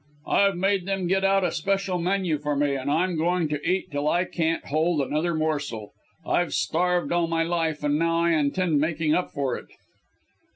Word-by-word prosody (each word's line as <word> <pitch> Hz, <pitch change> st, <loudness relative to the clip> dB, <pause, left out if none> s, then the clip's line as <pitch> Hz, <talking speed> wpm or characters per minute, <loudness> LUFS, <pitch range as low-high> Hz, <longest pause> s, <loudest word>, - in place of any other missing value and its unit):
I've 200 Hz, -1 st, +3 dB
made 190 Hz, 0 st, 0 dB
them 195 Hz, -2 st, -1 dB
get 190 Hz, +2 st, +1 dB
out 195 Hz, 0 st, +3 dB
a 175 Hz, -, +1 dB
special 195 Hz, +2 st, -1 dB
menu 180 Hz, -3 st, 0 dB
for 150 Hz, 0 st, -2 dB
me, 145 Hz, 0 st, +1 dB
and 135 Hz, 0 st, -3 dB
I'm 175 Hz, +4 st, +1 dB
going 170 Hz, +1 st, +1 dB
to 150 Hz, -1 st, -2 dB
eat 185 Hz, -2 st, -1 dB
till 145 Hz, +1 st, -2 dB
I 175 Hz, +3 st, +2 dB
can't 165 Hz, -2 st, -1 dB
hold 155 Hz, +2 st, +1 dB
another 155 Hz, +5 st, 0 dB
morsel. 145 Hz, -9 st, -2 dB, 0.3 s
I've 175 Hz, -1 st, 0 dB
starved 180 Hz, +1 st, 0 dB
all 170 Hz, -1 st, +2 dB
my 165 Hz, 0 st, 0 dB
life 165 Hz, -2 st, -1 dB
and 145 Hz, 0 st, +1 dB
now 165 Hz, 0 st, +1 dB
I 170 Hz, 0 st, +2 dB
intend 155 Hz, +1 st, +1 dB
making 155 Hz, 0 st, 0 dB
up 180 Hz, -, 0 dB
for 135 Hz, -3 st, -1 dB
it." -, -, -9 dB
165 Hz, 195 wpm, -25 LUFS, 150-180 Hz, 0.3 s, I've